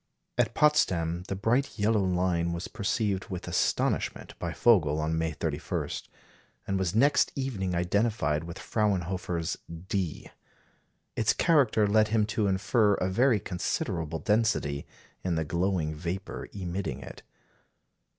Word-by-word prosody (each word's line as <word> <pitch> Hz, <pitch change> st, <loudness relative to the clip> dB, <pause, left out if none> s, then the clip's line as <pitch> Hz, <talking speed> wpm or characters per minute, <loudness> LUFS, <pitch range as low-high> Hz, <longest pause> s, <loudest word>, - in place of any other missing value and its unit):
At -, -, +1 dB
Potsdam, 90 Hz, -, +2 dB
the 100 Hz, -, -2 dB
bright 120 Hz, +8 st, 0 dB
yellow 105 Hz, 0 st, +2 dB
line 90 Hz, -2 st, +1 dB
was 85 Hz, +1 st, -4 dB
perceived 100 Hz, -1 st, -1 dB
with 95 Hz, -5 st, -6 dB
astonishment -, -, 0 dB
by -, -, -3 dB
Vogel 80 Hz, -11 st, +3 dB
on 80 Hz, +1 st, 0 dB
May 80 Hz, 0 st, 0 dB
31, 75 Hz, -, -3 dB, 0.8 s
and 95 Hz, -1 st, -1 dB
was 95 Hz, 0 st, -1 dB
next 140 Hz, +6 st, +4 dB
evening 105 Hz, -10 st, -2 dB
identified 90 Hz, -3 st, +1 dB
with 85 Hz, +2 st, -7 dB
Fraunhofer's 90 Hz, -5 st, -1 dB, 0.3 s
"D." 90 Hz, -6 st, -2 dB, 0.8 s
Its 110 Hz, -1 st, +2 dB
character 135 Hz, -10 st, +3 dB
led 110 Hz, +1 st, +4 dB
him 110 Hz, -1 st, +2 dB
to 105 Hz, -3 st, +1 dB
infer 100 Hz, +2 st, +3 dB
a 90 Hz, -, -1 dB
very 120 Hz, +2 st, +3 dB
considerable 85 Hz, -3 st, -2 dB
density 105 Hz, -10 st, 0 dB, 0.4 s
in 90 Hz, -2 st, 0 dB
the 80 Hz, 0 st, 0 dB
glowing 85 Hz, -1 st, 0 dB
vapour 90 Hz, +5 st, -5 dB
emitting 95 Hz, 0 st, -4 dB
it. -, -, -10 dB
95 Hz, 130 wpm, -28 LUFS, 85-110 Hz, 0.8 s, next